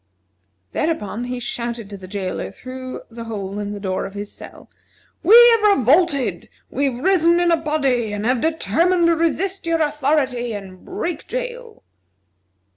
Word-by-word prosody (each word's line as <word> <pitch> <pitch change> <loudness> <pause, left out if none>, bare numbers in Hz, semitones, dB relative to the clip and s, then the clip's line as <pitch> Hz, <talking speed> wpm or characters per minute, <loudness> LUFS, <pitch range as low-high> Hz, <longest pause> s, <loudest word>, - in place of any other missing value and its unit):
Thereupon 245 -7 -2
he 250 0 -4
shouted 235 -2 -4
to - - -6
the 190 -1 -10
jailer 190 -1 -4
through 255 0 -8
the 230 0 -8
hole 205 -3 -5
in 205 0 -4
the 205 - -6
door 190 -2 -2
of 195 - -13
his 205 0 -6
cell: - - -12 0.5
"We 410 +7 +6 0.2
have 425 -3 +4
revolted! 280 +2 +2 0.2
We 280 - 0
have 255 -2 -2
risen 345 -1 +4
in 350 -1 +3
a - - +6
body, 275 -8 0
and 205 +1 -3
have 250 0 +1
determined 330 - +2
to 335 0 +4
resist 340 +3 -1
your 330 0 +1
authority, 275 -5 0
and 190 -3 -9
break 360 -5 -4
jail!" - - -6
265 Hz, 160 wpm, -21 LUFS, 220-335 Hz, 0.5 s, We